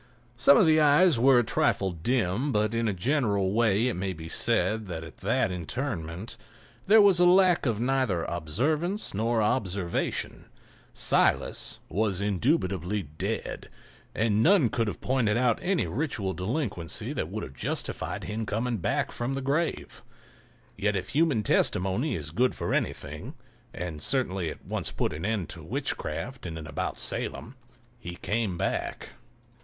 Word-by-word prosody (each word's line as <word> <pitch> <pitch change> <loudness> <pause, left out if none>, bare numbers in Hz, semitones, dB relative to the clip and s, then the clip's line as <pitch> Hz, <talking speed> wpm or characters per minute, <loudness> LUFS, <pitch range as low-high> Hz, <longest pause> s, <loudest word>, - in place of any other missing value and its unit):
Some 130 +3 +6
of - - +6
the 155 -1 +5
eyes 150 -1 +5
were 130 +1 +6
a 120 - +5
trifle 115 -6 +1
dim, 115 - 0
but 105 -1 +1
in 115 0 0
a - - +2
general 100 - +1
way 110 0 +3
it 125 - 0
may 95 +1 -3
be 80 -1 -9
said 110 +3 +1
that 80 -3 -5
at 80 - -11
that 110 +2 0
interment 90 - -4 0.5
there 220 +3 +7
was 195 -3 +5
lack 180 -3 +5
of 110 -3 0
neither 125 -8 +1
observance 145 - -2
nor 110 +2 +1
observation; 95 -5 -1 0.5
Silas - - +1
was 100 -2 0
indubitably 100 - 0
dead, 75 0 -5 0.5
and 110 0 +2
none 165 - +5
could 115 +1 0
have 95 -4 -5
pointed 120 -4 +1
out 120 -2 +2
any 185 -1 +1
ritual 115 -11 -2
delinquency 95 - -3
that - - -3
would - - -4
have 65 - -8
justified - - -3
him 105 +1 -4
in 110 - -2
coming 115 +3 -1
back 85 - -1
from 120 +3 -3
the - - -2
grave. 145 +5 -2 0.7
Yet 105 +1 0
if 95 -1 -3
human 145 -7 +2
testimony 95 - +1
is 75 -3 -5
good 125 +8 +1
for - - -2
anything 75 - -3 0.4
(and 85 -6 -6
certainly 95 - 0
it - - -10
once - - -2
put - - -1
an 80 +5 -5
end 105 -7 -1
to - - -6
witchcraft - - -4
in 80 -1 -6
and 80 -1 -7
about 75 - -3
Salem) 120 +4 -4 0.4
he 90 -6 -7
came 105 -2 -2
back. - - -2
110 Hz, 155 wpm, -27 LUFS, 90-130 Hz, 0.7 s, there